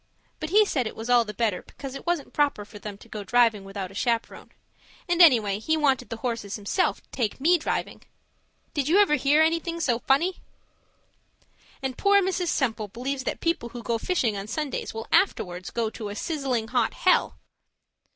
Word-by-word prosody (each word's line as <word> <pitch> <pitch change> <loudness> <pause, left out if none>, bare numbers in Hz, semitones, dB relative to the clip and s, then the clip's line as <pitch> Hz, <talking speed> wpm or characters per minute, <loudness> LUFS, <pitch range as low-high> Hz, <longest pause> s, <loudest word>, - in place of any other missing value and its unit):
But 310 - -4
he 420 +4 +5
said 260 - -1
it - - -7
was 225 +2 -4
all 240 -1 +5
the 210 - -5
better 210 -3 -1
because 275 -2 -9
it 275 - -9
wasn't 345 -5 -1
proper 285 -8 +1
for 210 0 -12
them 205 -1 -7
to 215 - -16
go 215 -2 -6
driving 225 -1 +3
without 195 -1 -6
a - - -13
chaperon; 230 +3 -2 0.6
and 350 0 +2
anyway, 220 - +5
he 315 +8 0
wanted 270 -5 +1
the 230 - -5
horses 230 -5 -3
himself 215 - -1
to - - -33
take 230 -3 -2
me 340 +5 +4
driving. - - -3 0.7
Did 285 -2 -1
you 340 +5 +4
ever 400 -7 +4
hear 295 +2 +4
anything 335 +1 0
so 245 -7 +1
funny? 335 +9 +1 1.5
And 260 -1 -3
poor 400 0 +5
Mrs. 370 -2 -1
Semple 225 -9 0
believes 260 +5 -4
that - - -3
people 330 -8 -1
who 240 0 -8
go 230 -1 -1
fishing 245 - 0
on 200 0 -5
Sundays 295 +3 -3
go 225 0 -6
afterwards 180 - +1
to 220 -2 -3
a 205 - -6
sizzling 260 -6 -2
hot 240 -2 +1
hell! 370 - +2
245 Hz, 190 wpm, -26 LUFS, 220-315 Hz, 1.5 s, he